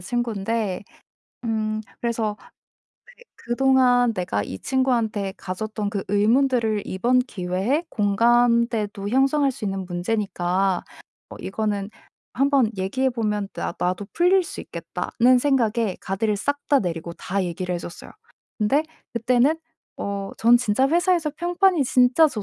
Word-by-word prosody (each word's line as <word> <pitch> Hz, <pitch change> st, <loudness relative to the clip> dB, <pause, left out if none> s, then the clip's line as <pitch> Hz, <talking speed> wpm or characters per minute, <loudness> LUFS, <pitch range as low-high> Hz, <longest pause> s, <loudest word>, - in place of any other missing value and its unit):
친구인데. 220 Hz, -2 st, -2 dB, 0.6 s
음 215 Hz, -1 st, -1 dB, 0.2 s
그래서 225 Hz, -3 st, -1 dB, 0.8 s
'그 485 Hz, -, -18 dB
그동안 245 Hz, -1 st, +3 dB
내가 175 Hz, -, -1 dB
이 95 Hz, -1 st, -6 dB
친구한테 230 Hz, -7 st, 0 dB
가졌던 210 Hz, +2 st, -4 dB
그 200 Hz, -2 st, -3 dB
의문들을 225 Hz, +1 st, +2 dB
이번 240 Hz, +7 st, +1 dB
기회에 210 Hz, -, -1 dB
공감대도 230 Hz, -1 st, +2 dB
형성할 275 Hz, +2 st, +3 dB
수 245 Hz, -4 st, -8 dB
있는 195 Hz, -1 st, -3 dB
문제니까 185 Hz, 0 st, -1 dB, 0.5 s
뭐 -, -, -10 dB
이거는 205 Hz, 0 st, -2 dB, 0.4 s
한번 275 Hz, -3 st, +2 dB
얘기해 255 Hz, +8 st, 0 dB
보면 210 Hz, -4 st, -2 dB
나 -, -, -3 dB
나도 185 Hz, +3 st, -1 dB
풀릴 365 Hz, +2 st, +4 dB
수 -, -, -7 dB
있겠다.'는 250 Hz, +2 st, +1 dB
생각에 235 Hz, -6 st, +1 dB
가드를 205 Hz, +2 st, -1 dB
싹 285 Hz, +5 st, -1 dB
다 285 Hz, -, +5 dB
내리고 170 Hz, -3 st, -3 dB
다 195 Hz, +1 st, -2 dB
얘기를 180 Hz, +1 st, -3 dB
해 -, -, -2 dB
줬어요. 170 Hz, -, -10 dB, 0.5 s
근데 245 Hz, +9 st, +2 dB, 0.3 s
그때는 250 Hz, +6 st, +2 dB, 0.4 s
어 200 Hz, -1 st, -4 dB
전 235 Hz, +2 st, +6 dB
진짜 255 Hz, +3 st, +1 dB
회사에서 345 Hz, -1 st, +2 dB
평판이 350 Hz, -3 st, +2 dB
진짜 250 Hz, +6 st, +5 dB
좋 220 Hz, -7 st, -5 dB
225 Hz, 280 characters per minute, -23 LUFS, 200-260 Hz, 0.8 s, 전